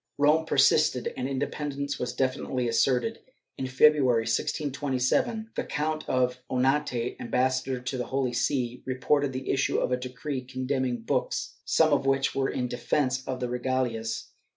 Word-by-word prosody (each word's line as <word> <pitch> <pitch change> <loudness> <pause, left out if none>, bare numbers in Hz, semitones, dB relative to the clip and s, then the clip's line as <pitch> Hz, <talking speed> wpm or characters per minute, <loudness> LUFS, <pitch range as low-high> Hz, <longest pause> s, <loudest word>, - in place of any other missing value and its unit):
^ - - -63
Rome 150 +3 +3
persisted, 155 -7 +3
and 130 +1 -3
independence 140 +1 -3
was 125 0 -2
definitely 130 -1 -1
asserted. 130 - +1 0.4
In 130 - -2
February, 130 -3 +4
1627, 145 - 0
the - - -1
Count 155 0 -2
of 125 0 +1
Onate, 130 -2 +1
ambassador 130 +1 0
to 130 +2 -4
the 125 - -3
Holy 130 -2 -1
See, 125 0 -1
reported 135 +2 +1
the 130 0 -3
issue 135 - +1
of - - 0
a 125 - +2
decree 130 +2 -4
condemning 130 -2 -2
books, - - -2
some - - +4
of 135 - +1
which 135 0 +2
were 135 -1 0
in 125 - -2
defence 130 +2 0
of 130 -1 -3
the 125 - -1
regalias. 120 -3 -2
130 Hz, 150 wpm, -27 LUFS, 125-140 Hz, 0.4 s, February